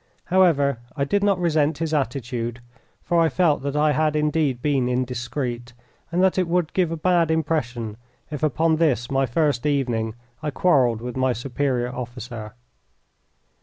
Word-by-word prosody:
However, 145 -9 +4 0.2
I 140 - +1
did 200 +8 +1
not 200 -2 +3
resent 155 -3 +1
his 160 -1 -2
attitude, 120 -4 -2 0.4
for 170 - +1
I 165 - +4
felt 165 -6 +2
that 140 +1 -3
I 150 0 +3
had 155 0 +1
indeed 150 -4 +1
been 135 -2 +1
indiscreet, 125 -1 -3 0.4
and 180 +2 +2
that 190 0 +3
it 180 - +1
would 170 -1 0
give 180 -3 +1
a 165 - -2
bad 170 0 +2
impression 125 -9 -1 0.3
if 150 - -4
upon 155 +2 +2
this 135 -7 +1
my 135 0 +2
first 140 0 +1
evening 120 -6 0 0.3
I 155 - -2
quarrelled 130 -9 +2
with 125 0 -5
my 130 -1 +2
superior 125 0 -2
officer. 120 -3 -7
140 Hz, 160 wpm, -23 LUFS, 125-160 Hz, 0.4 s, However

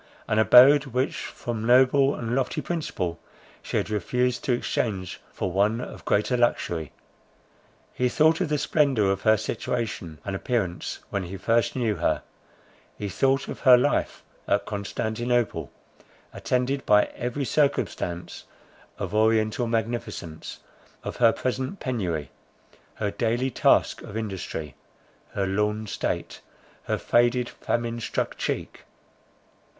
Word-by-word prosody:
An 110 - +2
abode, 135 +6 +7
which 130 +1 -1
from 115 -2 -5
noble 130 +3 +5
and 115 0 -3
lofty 135 -1 0
principle, 150 - -3 0.4
she - - -3
had - - -2
refused 125 +5 0
to - - +1
exchange 105 -6 -2
for 95 - -3
one 105 +5 +2
of - - -8
greater 105 +5 +2
luxury. 85 -10 0 1.0
He 125 0 +1
thought 160 +6 +3
of 180 - 0
the 150 - +1
splendour 135 -9 +2
of 100 0 -2
her 110 0 +4
situation 100 -6 -3
and 95 - -3
appearance 95 -5 -2
when 100 -2 -2
he 95 +3 -6
first 115 +4 +1
knew 115 -5 0
her; - - 0 0.7
he 105 - -4
thought 135 +8 +1
of - - -6
her 130 -3 +7
life 125 - 0 0.2
at - - +1
Constantinople, 110 +3 -2 0.6
attended 130 +2 -1
by 105 0 +6
every 125 +3 -3
circumstance 90 - -1 0.5
of 100 -1 -4
oriental 110 +2 +2
magnificence; 110 -8 -4 0.4
of - - -5
her 115 -2 +6
present 130 - -3
penury, 90 - -2 0.6
her 105 -2 -2
daily 120 +4 0
task - - +3
of 105 - -7
industry, 95 -8 -5 0.6
her 100 - 0
lorn 105 +3 0
state, 105 - -3 0.4
her - - 0
faded, 120 +1 +2
famine 120 -1 -2
struck 115 - -2
cheek. - - -4
115 Hz, 130 wpm, -25 LUFS, 100-125 Hz, 1.0 s, abode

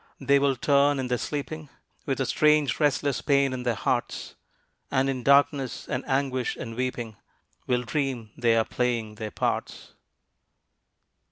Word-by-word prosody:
they 140 +1 +3
will 140 -1 +2
turn 140 +2 +3
in 130 -1 -3
their 125 - +1
sleeping 150 +3 -5 0.4
With 135 -1 -1
a 135 - +1
strange 150 +2 +3
restless 145 -2 +1
pain 140 -2 +2
in 130 - -4
their 120 -2 0
hearts, - - -2 0.6
And 130 +1 +1
in 130 -2 -2
darkness, 140 0 +2
and 130 -2 -2
anguish 130 -2 0
and 115 - -7
weeping, 120 -3 -3 0.5
Will 125 -1 +1
dream 125 -5 -2
they 120 -2 +2
are 115 -1 +3
playing 120 -3 -1
their 110 0 -5
parts. - - -3
130 Hz, 150 wpm, -26 LUFS, 125-140 Hz, 0.6 s, they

